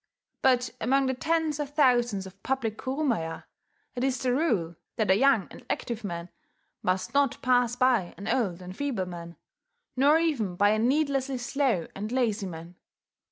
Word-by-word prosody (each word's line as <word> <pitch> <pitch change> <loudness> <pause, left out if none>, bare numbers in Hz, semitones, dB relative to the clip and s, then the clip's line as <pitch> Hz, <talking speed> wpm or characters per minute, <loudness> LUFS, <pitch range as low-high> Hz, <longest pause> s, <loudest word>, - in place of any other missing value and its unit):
But 250 -2 +3
among 270 +4 +2
the 260 - +1
tens 315 +2 0
of 290 -1 -4
thousands 240 -8 +3
of 190 +1 -13
public 240 -4 -1
kurumaya, 255 - -2 0.5
it 250 - -3
is 265 -1 +1
the 250 0 0
rule 220 - 0 0.2
that 215 -4 +2
a - - +6
young 225 -4 +3
and - - -12
active 235 -1 -3
man 170 -3 -5 0.5
must 185 +5 -1
not 280 -3 +2
pass 245 -2 +3
by 245 -8 +2
an 200 - -7
old 185 -8 0
and 180 +1 -8
feeble 250 -8 -2
man, 170 -1 -8 0.6
nor 285 +4 +5
even 275 - 0
by 205 +3 +4
a 215 - +1
needlessly 270 +1 +1
slow 245 - 0
and 210 +3 -5
lazy 230 -6 0
man. 170 +1 -9
245 Hz, 165 wpm, -27 LUFS, 195-270 Hz, 0.6 s, a